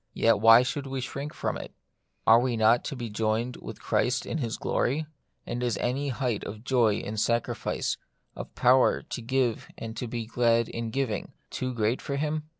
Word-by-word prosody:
Yet 115 -2 +3
why 115 +3 +8
should 135 +3 -3
we 135 0 -3
shrink 140 +3 -5
from - - -3
it? - - -10 0.5
Are 115 +1 +7
we 120 -1 0
not 110 +2 +4
to - - -3
be 120 -2 -5
joined 110 +3 -1
with - - -9
Christ 125 0 +1
in 160 - -3
His 115 -5 -2
glory; 145 +6 0 0.4
and 120 +1 -4
is 120 -4 0
any 135 +4 -1
height 125 -4 -1
of 110 +2 -7
joy 120 -5 +3
in 105 +1 -5
sacrifice, 115 +2 0 0.4
of - - -8
power 125 +1 +4
to - - -6
give 125 -1 0
and 115 0 -6
to 125 - -3
be 115 0 -4
glad 115 0 +2
in 115 -1 -4
giving, 120 -3 -2 0.2
too 130 0 -2
great 115 +2 0
for 140 - -3
Him 150 +1 -2
120 Hz, 190 wpm, -27 LUFS, 115-130 Hz, 0.5 s, why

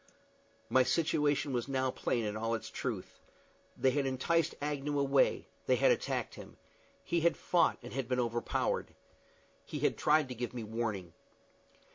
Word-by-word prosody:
My 130 - +4
situation 145 0 +1
was 120 0 -1
now 130 -1 0
plain 120 -2 -1
in 105 0 -2
all 115 +1 0
its 110 - -6
truth. - - -4 0.6
They 130 - +3
had 140 0 0
enticed 160 +5 +1
Agnew 145 0 -2
away; 140 -1 +3 0.2
they - - +5
had - - +4
attacked 485 - -1
him. - - -11 0.5
He 170 - 0
had 170 +1 +3
fought, 175 - +2
and 120 - -8
had 135 -2 -2
been 125 0 0
overpowered. 120 -1 -1 0.7
He - - -6
had - - +2
tried 150 -1 +4
to - - -3
give 120 +1 -5
me 120 - -4
warning. 105 -6 -3
130 Hz, 160 wpm, -33 LUFS, 120-145 Hz, 0.7 s, they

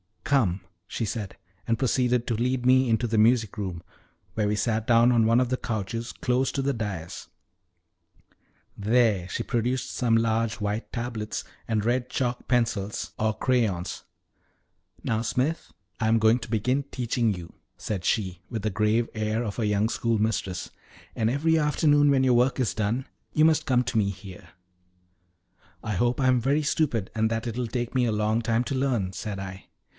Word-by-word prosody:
"Come," 105 -10 +2 0.3
she - - -3
said, 105 -2 -4 0.3
and 115 -1 +1
proceeded 125 -1 +1
to 115 - -1
lead 125 +2 -1
me 130 0 +5
into 115 +2 +2
the 110 -1 0
music 110 -1 +3
room, 90 -5 -4 0.5
where 105 -2 0
we 105 - +1
sat 110 +1 -1
down 120 +1 +5
on 115 -2 +4
one 115 +2 +4
of 125 - 0
the 130 - 0
couches 115 +1 -4
close 130 +1 0
to 140 - -1
the 140 +1 +1
dais; 100 -8 -5 1.5
there 105 -3 +2
she 115 - -3
produced 125 +3 -1
some 120 -3 +1
large 115 0 +1
white 105 +1 -3
tablets, 120 -3 -4 0.2
and 110 -2 0
red 125 +2 0
chalk 125 -2 -2
pencils 115 -5 0
or 110 -1 0
crayons. 110 -9 0 1.0
"Now, 110 -1 0
Smith, 130 +8 -1 0.3
I 110 - +1
am 115 +1 +4
going 110 +2 +4
to 110 -1 -9
begin 125 +5 +1
teaching 120 -4 -1
you," 85 -2 -9 0.2
said 95 -5 -4
she, 95 -5 0
with 115 -3 -3
the 110 - 0
grave 110 +3 +1
air 110 +1 -1
of 105 0 -4
a 110 - +1
young 105 +1 +1
schoolmistress; 110 -6 -1 0.4
"and 110 0 0
every 160 +5 +2
afternoon, 145 -1 +3
when 135 -2 +3
your 130 -1 +4
work 125 +2 +3
is 125 -5 +1
done, 110 +5 -1 0.3
you 155 - +3
must 160 -1 +4
come 125 -1 +3
to 120 - -2
me 100 -2 +2
here." 95 -1 -10 1.4
"I 110 - -3
hope 120 +7 +1
I 130 - +3
am 125 -1 +4
very 140 +6 +1
stupid, 135 -9 0
and 110 0 +1
that 115 +1 -2
it 115 0 -4
will 125 -1 -1
take 120 +1 -3
me 130 -2 +2
a 115 - +1
long 105 +2 +1
time 115 +1 +1
to 125 - -4
learn," 130 -8 0
said 100 +2 -5
I. 95 0 -7
115 Hz, 180 wpm, -26 LUFS, 105-125 Hz, 1.5 s, me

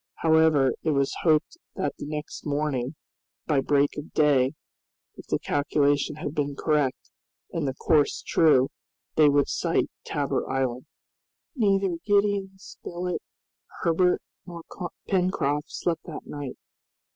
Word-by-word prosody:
However, 160 -4 +4
it 160 - -1
was 140 -2 +1
hoped 160 - +2 0.2
that - - -1
the - - -5
next 150 0 -6
morning 145 -2 -1 0.5
by 150 -3 +2
break 145 +1 +2
of 150 - -9
day, 140 -3 +3 0.6
if - - -12
the - - +1
calculation 145 0 +1
had 150 -1 -5
been 145 -2 -1
correct 150 -3 0 0.4
and 160 -4 -2
the 130 - -2
course 150 0 +2
true, 135 -5 +4 0.5
they 155 -2 +6
would 145 0 +3
sight - - 0
Tabor - - -2
Island. 130 0 -1 0.7
Neither 195 -6 +2
Gideon 205 -1 +2
Spilett, 180 -1 -5 0.6
Herbert, 180 +1 +2 0.2
nor 170 -2 -8 0.4
Pencroft 180 -6 +1
slept 170 -2 -1
that 160 - -8
night. 145 -3 -6
150 Hz, 125 wpm, -26 LUFS, 140-170 Hz, 0.7 s, they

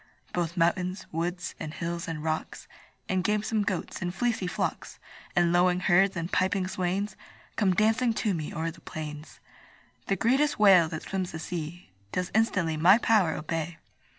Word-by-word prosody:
Both 175 0 -2
mountains, 180 +2 +1
woods, 175 +2 -3
and 155 0 -6
hills, 170 0 -3
and 155 -2 -4
rocks 160 0 -3 0.4
And 185 -1 0
gamesome 210 +1 +1
goats, 190 -3 -3
and 175 -1 -1
fleecy 225 -2 -1
flocks, 180 - -3 0.4
And 175 -1 +3
lowing 180 0 +3
herds, 190 +1 +4
and 170 +1 -3
piping 185 0 +1
swains, 190 +2 -2 0.4
Come 190 -4 +2
dancing 225 +4 +3
to 210 -2 0
me 155 -3 -4
o'er 165 +1 -2
the - - -16
plains. 150 -1 -7 0.7
The 195 - +2
greatest 265 +9 +2
whale 190 -6 +6
that 160 - -5
swims 190 -2 -3
the - - -4
sea 160 - -6 0.2
Does 180 -1 -2
instantly 185 -8 +1
my 180 +6 +7
power 215 -8 +3
obey. 160 +1 -3
180 Hz, 160 wpm, -28 LUFS, 165-195 Hz, 0.7 s, my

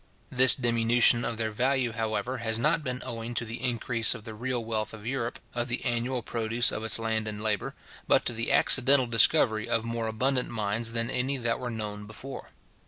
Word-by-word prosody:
This 130 0 +9
diminution 120 -1 +2
of 115 - -4
their 110 -1 -3
value, 125 +2 -1
however, 115 +3 -4
has 110 -1 -1
not 150 +6 0
been 125 -1 -5
owing 115 +1 -6
to 115 - -2
the 115 +1 -8
increase 120 -2 0
of 115 - -11
the 110 -1 -9
real 120 +1 -4
wealth 110 -1 -4
of 105 -1 -14
Europe, 120 -1 -4 0.2
of 120 0 -2
the 125 +2 -2
annual 120 0 -2
produce 115 +1 +1
of 110 - -5
its 110 - +2
land 110 -1 -2
and 105 -1 -6
labour, 105 -2 -3 0.3
but - - +3
to - - -1
the 115 0 -2
accidental 130 0 +5
discovery 115 -1 +3
of 115 -1 0
more 115 -1 -4
abundant 125 +4 0
mines 110 +1 -2
than 115 +1 -2
any 130 +2 -2
that 115 -2 -2
were 125 -1 -5
known 105 -2 -5
before. 130 +6 -10
115 Hz, 200 wpm, -26 LUFS, 110-125 Hz, 0.3 s, This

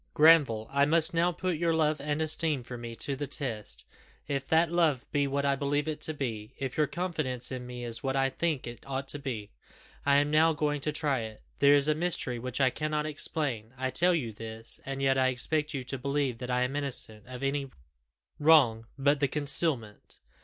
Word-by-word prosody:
"Granville! 145 -9 +5
I 140 +1 +3
must 165 +3 +2
now 170 +1 +2
put 180 0 -2
your 165 0 +1
love 155 -2 +1
and 150 +2 -1
esteem 155 -3 0
for 125 +1 -8
me 120 -1 -7
to 140 +4 -2
the 145 +1 -4
test. 105 - -4 0.4
If 140 -2 -2
that 165 +1 +3
love 160 -7 +2
be 145 -1 +1
what 140 +1 -1
I 140 -1 +3
believe 145 +2 -1
it 150 -1 -3
to 155 - -2
be; 110 -6 -5
if 135 -1 -4
your 150 -1 +2
confidence 155 -10 -3
in 125 -1 -5
me 125 0 -7
is 120 -1 -4
what 135 -1 -1
I 135 0 +2
think 160 -2 -1
it 120 0 -8
ought 135 0 -3
to 145 - -1
be, 115 -7 -5 0.5
I 140 0 +3
am 145 +1 +3
now 160 +1 +4
going 150 -1 -1
to 150 - -1
try 150 -3 0
it. 110 -1 -8 0.2
There 140 0 +6
is 140 0 +2
a 155 - +4
mystery 155 -7 -1
which 125 +2 -4
I 130 -2 +4
cannot 150 +1 -2
explain. 140 -6 -3
I 130 0 -2
tell 175 +7 +3
you 120 -9 -3
this, 110 +1 -2
and 135 0 -3
yet 135 -1 +3
I 130 - +4
expect 150 +4 0
you 135 - -3
to 135 +1 -3
believe 140 -2 -1
that 125 0 -6
I 125 0 +1
am 130 +2 -2
innocent 125 -6 -3
of 130 +1 -8
anything 135 -1 -1 0.7
wrong 135 -8 +5
but 140 +1 +2
the 140 - +2
concealment. 140 -6 +1
140 Hz, 215 wpm, -29 LUFS, 125-150 Hz, 0.7 s, There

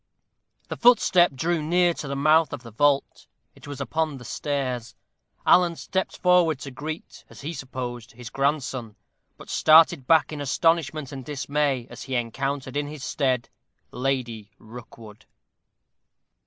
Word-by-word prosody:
The - - -6
footstep 190 - +5
drew 165 +4 0
near 175 +3 +2
to 150 - -7
the 140 - -3
mouth 155 +3 +3
of 130 - -7
the 115 - -11
vault 140 +4 +1 0.3
it - - -15
was 145 -1 -7
upon 155 +2 -2
the 125 - -12
stairs. 130 -3 -3 0.5
Alan 175 -2 +5
stepped 190 +3 -3
forward 180 -4 +3
to 140 - -7
greet, 155 +5 -7
as - - -13
he 155 +4 -5
supposed, 125 -3 -6
his 120 -1 -10
grandson, 135 -5 -2 0.4
but - - -13
started 155 -4 +5
back 160 -1 +4
in 145 - -5
astonishment 155 0 0
and 135 -2 -7
dismay 140 -2 -1
as - - -10
he 135 -1 -4
encountered 135 +3 -3
in 145 0 -1
his 150 -2 -8
stead 130 -4 -1 0.4
Lady 125 -5 -3
Rookwood. 110 -1 -13
140 Hz, 145 wpm, -25 LUFS, 125-155 Hz, 0.5 s, footstep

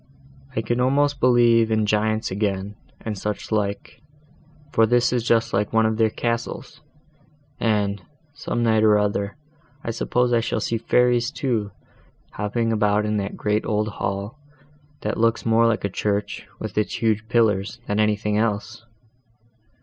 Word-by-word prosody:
I 110 - +1
can 120 +2 -1
almost 140 +2 +2
believe 120 -2 +4
in 110 -1 +1
giants 110 +1 0
again, 100 0 -2 0.3
and 110 -2 -4
such 105 +3 -4
like, 100 -2 -2 0.7
for 115 -4 +4
this 120 +2 +2
is 120 -2 0
just 115 0 +1
like 100 +1 0
one 110 0 +4
of 110 0 0
their 110 -1 +3
castles; 115 +1 -4 0.8
and, 105 -3 0 0.3
some 120 -4 -3
night 110 -1 +3
or 105 -1 +5
other, 100 -1 -1 0.5
I 115 - -2
suppose 125 +2 0
I 120 - +4
shall 115 - -1
see 115 - -1
fairies 120 +1 +2
too, 115 -8 -2 0.6
hopping 115 +2 -1
about 105 -1 +2
in 105 0 0
that 100 0 -4
great 105 +1 0
old 105 0 0
hall, 100 +5 -4 0.6
that 105 +1 -2
looks 115 0 +1
more 115 0 +4
like 115 -3 0
a - - +2
church, 100 +1 -2
with 110 -3 -6
its 105 - -1
huge 110 -1 0
pillars, 110 -2 +1
than 105 +1 -1
anything 105 0 +1
else." 110 -1 -2
110 Hz, 155 wpm, -23 LUFS, 105-115 Hz, 0.8 s, or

